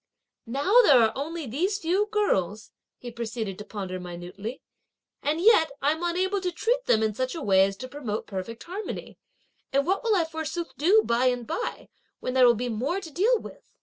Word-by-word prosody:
"Now 290 - +4
there 285 - +6
are 225 -1 +4
only 320 +3 -4
these 345 - -1
few 385 +3 +1
girls," 220 - 0 0.3
he 245 - -8
proceeded 225 -4 -4
to - - -6
ponder 190 -4 -5
minutely, 180 +7 -7 0.6
"and 300 +3 0
yet, 360 -4 +5
I'm 305 +4 +1
unable 375 +3 0
to 365 -1 -1
treat 470 +8 0
them 220 - +4
in 215 -1 +1
such 255 +6 -2
a 330 - -5
way 190 -3 +5
as 195 0 -4
to 255 - -7
promote 245 -6 -4
perfect 210 +4 -6
harmony; 385 +5 -7 0.5
and 275 +1 +2
what 385 +7 0
will 450 -3 +2
I 345 -4 +2
forsooth 320 +1 -5
do 395 +9 +4
by 235 +2 +2
and 245 -1 0
by 475 - -4 0.3
(when 255 - -3
there 255 -1 +6
will 240 - +5
be 245 +3 -3
more 255 - -1
to 335 -5 -10
deal 425 - +3
with)!" - - -11
280 Hz, 195 wpm, -26 LUFS, 225-365 Hz, 0.6 s, there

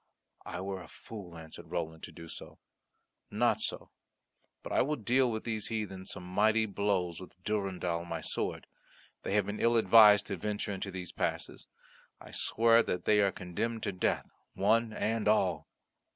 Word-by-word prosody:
"I 90 - -5
were 95 -1 -4
a 90 - -11
fool," 95 -7 -10
answered 80 -1 -10
Roland, 80 -2 -4
"so - - -3
to - - -12
do. 85 -1 -10 0.7
Not - - +2
so; - - -3 0.7
but - - -7
I - - +3
will 150 +3 +1
deal 120 -1 +2
these 110 -2 -3
heathen 95 -4 -4
some - - -4
mighty 110 +5 +2
blows 95 -4 -1
with 90 - -11
Durendal 95 -5 -1
my 85 -1 -4
sword. - - -2 0.6
They - - -3
have 105 -2 +3
been 105 +1 -4
ill 115 0 +3
advised 105 -1 +7
to 100 - -4
venture 105 +3 -3
into 95 0 -4
these 90 -2 -6
passes. - - -3 0.5
I - - -13
swear 115 +1 +4
that 90 - -3
they 105 -1 +5
are 100 -1 +3
condemned 110 +6 -3
to 100 - 0
death, 90 - 0 0.3
one 110 +3 +2
and 110 0 -1
all." 95 -6 +2
100 Hz, 165 wpm, -31 LUFS, 90-110 Hz, 0.7 s, advised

